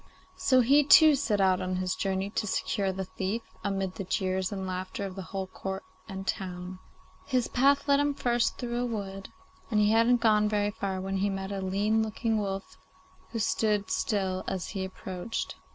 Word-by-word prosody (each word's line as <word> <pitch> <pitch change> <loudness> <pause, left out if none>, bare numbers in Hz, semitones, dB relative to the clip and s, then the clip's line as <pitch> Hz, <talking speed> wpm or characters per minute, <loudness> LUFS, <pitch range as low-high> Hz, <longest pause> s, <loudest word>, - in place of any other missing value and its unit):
So 270 -9 +4
he 280 +5 +5
too 305 +2 +8
set 260 -7 0
out 190 -1 +3
on 185 0 -2
his 185 0 -1
journey 195 +1 -2
to 215 - -2
secure 195 0 0
the 190 0 -4
thief, 190 +5 -3 0.2
amid 195 -2 -1
the 195 - -5
jeers 185 0 -1
and 190 -2 -4
laughter 185 +3 -4
of 190 - -5
the 195 - -5
whole 195 -1 -3
court 190 +1 -6 0.3
and 190 0 -6
town. 185 -1 -4 0.5
His 255 -4 +1
path 280 +3 +3
led 280 0 +5
him 290 0 +1
first 240 -3 +1
through 240 -1 -2
a - - 0
wood, 195 -4 -5 0.4
and 215 -4 +2
he 210 0 +4
hadn't 230 +2 +4
gone 210 -2 +4
very 205 -1 +1
far 195 -2 -3
when 195 +1 -2
he 200 +1 +1
met 195 0 -4
a 195 -1 -3
lean 205 +4 +1
looking 220 0 -1
wolf 195 -1 -4 0.5
who 230 - -5
stood 210 -1 +1
still 190 -3 0
as 185 -2 -3
he 195 -3 -3
approached. 190 +2 -5
200 Hz, 190 wpm, -29 LUFS, 190-230 Hz, 0.5 s, too